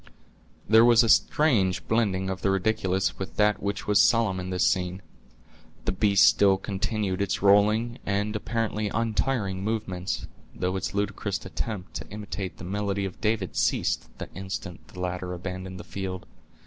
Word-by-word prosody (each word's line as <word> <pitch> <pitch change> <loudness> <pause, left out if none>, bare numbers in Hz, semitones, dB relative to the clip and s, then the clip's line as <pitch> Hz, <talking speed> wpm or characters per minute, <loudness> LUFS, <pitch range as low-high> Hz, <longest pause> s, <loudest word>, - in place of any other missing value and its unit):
There 110 +2 +7
was 120 0 +6
a 115 - +1
strange 110 - +3
blending 100 -5 +1
of 95 - -5
the 100 - +1
ridiculous 95 -1 0
with 95 - -5
that 105 0 +2
which 100 +1 -3
was 105 -1 +4
solemn 110 -5 +3
in 90 0 -5
this 90 -1 +1
scene. 90 +1 0 0.8
The - - +1
beast 100 +1 +4
still 100 -1 +5
continued 100 0 -2
its 100 0 -1
rolling, 105 +4 +4
and 105 +2 -1
apparently 110 -1 -2
untiring 110 -3 -1
movements, 100 -4 -3 0.3
though 90 +1 -1
its 95 +1 -3
ludicrous 100 -1 -2
attempt 95 -1 -5
to - - -9
imitate 100 -4 -6
the - - -10
melody 100 +1 -2
of 95 - -7
David 105 -4 -1
ceased - - 0
the - - -8
instant 95 -2 -6
the 90 - -12
latter 90 0 -3
abandoned 95 +1 -6
the - - -7
field. 95 -2 -5
100 Hz, 160 wpm, -26 LUFS, 95-105 Hz, 0.8 s, There